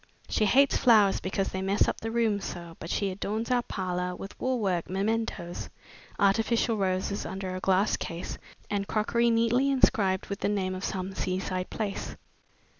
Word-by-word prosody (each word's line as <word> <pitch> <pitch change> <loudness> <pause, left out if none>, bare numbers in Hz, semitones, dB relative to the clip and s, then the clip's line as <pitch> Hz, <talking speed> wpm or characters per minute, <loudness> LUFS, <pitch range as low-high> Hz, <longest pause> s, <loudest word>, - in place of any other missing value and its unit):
She 215 - +2
hates 270 +6 +4
flowers 215 -6 +5
because 190 +1 -1
they 190 - -4
mess 195 +2 +2
up - - -2
the 225 - -3
rooms 225 -3 +1
so, 170 -1 -7
but 165 - -7
she 200 +1 0
adorns 215 +5 -3
our 245 -1 +3
parlor 180 -4 -3
with 195 - -9
wool 255 -1 0
work 185 -5 0
mementoes, 195 -2 -2 0.5
artificial 225 +3 +2
roses 190 0 -1
under 190 0 -4
a - - -3
glass 190 +2 +2
case, 170 0 -5 0.3
and 200 -1 -2
crockery 235 +2 +2
neatly 230 +4 +3
inscribed 200 -8 +3
with 200 - -5
the - - 0
name 190 -2 0
of 185 +1 -6
some 190 0 -3
seaside 185 0 -2
place." 205 -3 -4
200 Hz, 170 wpm, -28 LUFS, 185-225 Hz, 0.5 s, flowers